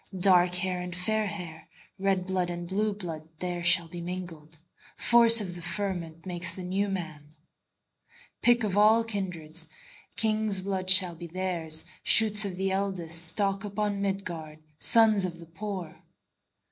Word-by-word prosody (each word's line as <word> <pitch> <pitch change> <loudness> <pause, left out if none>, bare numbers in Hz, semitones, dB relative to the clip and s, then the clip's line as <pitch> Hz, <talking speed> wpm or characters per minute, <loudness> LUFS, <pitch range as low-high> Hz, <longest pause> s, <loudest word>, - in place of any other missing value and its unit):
Dark 180 -1 +5
hair 180 0 0
and 180 -1 -6
fair 215 +4 -1
hair, 170 -6 -9 0.3
Red 190 -1 -1
blood 185 -2 -2
and 175 0 -7
blue 210 +4 -1
blood, 165 -6 -8
There 175 0 -5
shall 170 -1 +6
be 175 +1 -9
mingled; 170 -3 -8 0.4
Force 235 -1 +7
of 190 -4 -5
the 175 - -11
fermentMakes 175 -1 -4
the 185 - -8
New 195 +3 -2
Man.Pick 180 - -5
of 200 -3 -2
all 215 +2 +4
kindreds, 175 -7 -6 0.5
King's 215 -2 0
blood 190 -1 -4
shall 185 -2 +7
theirs 170 -2 -3
be, 170 - -21
Shoots 215 -1 +5
of 190 -2 -5
the 190 +1 -2
eldestStock 190 +1 -2
upon 205 -1 -4
Midgard, 175 -6 -5 0.2
Sons 220 -3 +4
of 175 -2 -4
the 170 - -13
poor. 185 0 -8
185 Hz, 140 wpm, -26 LUFS, 170-200 Hz, 0.5 s, Force